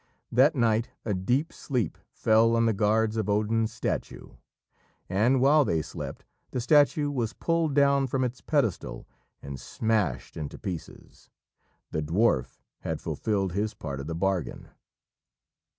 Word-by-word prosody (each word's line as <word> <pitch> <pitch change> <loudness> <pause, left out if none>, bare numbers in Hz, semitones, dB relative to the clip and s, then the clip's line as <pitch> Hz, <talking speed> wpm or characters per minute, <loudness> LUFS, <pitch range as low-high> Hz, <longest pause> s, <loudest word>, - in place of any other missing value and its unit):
That 135 +7 +5
night 115 -2 +2 0.2
a 105 - 0
deep 125 - 0
sleep 125 - -2 0.2
fell 115 +1 +3
on 115 0 +3
the 115 - +3
guards 110 +2 +1
of 105 -2 -1
Odin's 110 +2 +1
statue, - - -4 0.8
and, 115 +8 +2
while 145 +4 +5
they 80 - 0
slept, 75 - -7 0.2
the 125 - -3
statue 145 +3 +3
was 120 -5 -2
pulled 165 -4 0
down 140 -1 +4
from 130 +1 0
its 125 0 -3
pedestal 135 - -1 0.4
and 70 -1 -7
smashed 100 - -1
into 75 -3 -6
pieces. 90 -6 -8 0.6
The 80 - -1
dwarf 80 - +1 0.2
had - - -3
fulfilled 100 -4 -1
his 105 +3 -1
part 70 -3 -5
of 70 - -6
the 80 - -3
bargain. 95 0 -2
110 Hz, 140 wpm, -27 LUFS, 95-130 Hz, 0.8 s, That